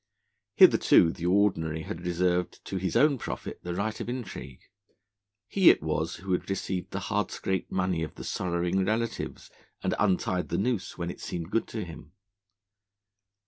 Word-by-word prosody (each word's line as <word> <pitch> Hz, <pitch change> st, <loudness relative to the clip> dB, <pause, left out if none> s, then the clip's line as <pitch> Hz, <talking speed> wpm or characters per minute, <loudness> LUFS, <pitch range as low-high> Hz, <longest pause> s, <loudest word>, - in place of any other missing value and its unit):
Hitherto 80 Hz, -, +6 dB
the 85 Hz, +1 st, -4 dB
Ordinary 85 Hz, -5 st, +2 dB
had 90 Hz, +3 st, -6 dB
reserved 90 Hz, 0 st, 0 dB
to 95 Hz, -, -3 dB
his 95 Hz, -2 st, -2 dB
own 145 Hz, -3 st, +4 dB
profit -, -, -5 dB
the 85 Hz, 0 st, -4 dB
right 110 Hz, +3 st, -2 dB
of -, -, -4 dB
intrigue; 115 Hz, -, -6 dB, 0.9 s
he 190 Hz, -3 st, +6 dB
it -, -, +4 dB
was 80 Hz, +1 st, -1 dB
who 95 Hz, +2 st, -6 dB
had 90 Hz, -, 0 dB
received 95 Hz, -1 st, -2 dB
the -, -, -4 dB
hard -, -, -1 dB
scraped 95 Hz, -1 st, -3 dB
money 90 Hz, -3 st, 0 dB
of 80 Hz, -, -4 dB
the -, -, -8 dB
sorrowing 90 Hz, +1 st, 0 dB
relatives, 110 Hz, +4 st, -2 dB, 0.3 s
and -, -, +1 dB
untied 90 Hz, -1 st, +1 dB
the -, -, -1 dB
noose 115 Hz, -1 st, -1 dB
when 85 Hz, 0 st, -3 dB
it -, -, -11 dB
seemed 85 Hz, +1 st, -5 dB
good 115 Hz, -, +1 dB
to 110 Hz, -, -4 dB
him. 80 Hz, -1 st, -11 dB
90 Hz, 165 wpm, -28 LUFS, 85-100 Hz, 0.9 s, Hitherto